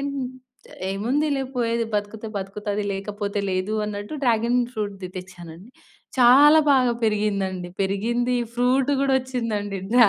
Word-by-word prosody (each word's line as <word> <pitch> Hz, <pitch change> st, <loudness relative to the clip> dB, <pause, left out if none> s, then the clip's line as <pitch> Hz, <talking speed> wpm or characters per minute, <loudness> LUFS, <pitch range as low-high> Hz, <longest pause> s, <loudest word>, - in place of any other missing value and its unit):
అన్ 280 Hz, 0 st, -3 dB, 0.8 s
ఏముందిలే 270 Hz, +8 st, 0 dB
పోయేది 230 Hz, -1 st, +1 dB
బతుకుతే 210 Hz, +2 st, -3 dB
బతుకుతది, 205 Hz, +1 st, -3 dB
లేకపోతే 200 Hz, +1 st, -4 dB
లేదు 185 Hz, +3 st, -1 dB
అన్నట్టు 205 Hz, +5 st, -5 dB
డ్రాగన్ 235 Hz, 0 st, +2 dB
ఫ్రూట్‌ది 200 Hz, -5 st, -4 dB
తెచ్చానండి. 180 Hz, +2 st, -10 dB, 0.5 s
చాలా 285 Hz, +6 st, +8 dB
బాగా 255 Hz, -3 st, +4 dB
పెరిగిందండి. 200 Hz, -4 st, -1 dB
పెరిగింది 235 Hz, +6 st, 0 dB, 0.2 s
ఫ్రూట్ 255 Hz, +3 st, +2 dB
గూడా 275 Hz, -1 st, +2 dB
ఒచ్చిందండి. 220 Hz, -6 st, -3 dB
డ్రా 240 Hz, -3 st, +7 dB
215 Hz, 115 wpm, -23 LUFS, 200-245 Hz, 0.8 s, చాలా